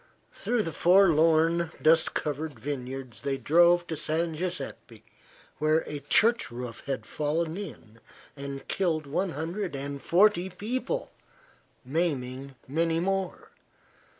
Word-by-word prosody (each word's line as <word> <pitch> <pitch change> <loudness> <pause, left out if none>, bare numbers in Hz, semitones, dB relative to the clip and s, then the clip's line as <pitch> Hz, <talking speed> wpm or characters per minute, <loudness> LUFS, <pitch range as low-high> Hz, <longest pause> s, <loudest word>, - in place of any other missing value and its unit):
Through 240 -3 0
the 165 - -3
forlorn, 165 -2 +4
dust 160 +1 +4
covered 150 -3 -3
vineyards 130 -2 -5
they 135 -1 -1
drove 175 +4 +4
to 165 - -4
San 160 +2 -1
Guiseppe, 170 -3 -5 0.6
where 155 +1 +3
a 150 - -5
church 225 - +2
roof 120 -1 -7
had 135 -1 -3
fallen 160 +2 -1
in 115 - -9 0.4
and 140 -1 -7
killed 165 -5 0
one 175 +5 -1
hundred 170 +3 -3
and 140 0 -5
forty 190 0 +4
people, 250 - -3 0.7
maiming 135 -3 -2
many 165 +4 +1
more. 190 +1 -2
160 Hz, 120 wpm, -28 LUFS, 140-175 Hz, 0.7 s, forlorn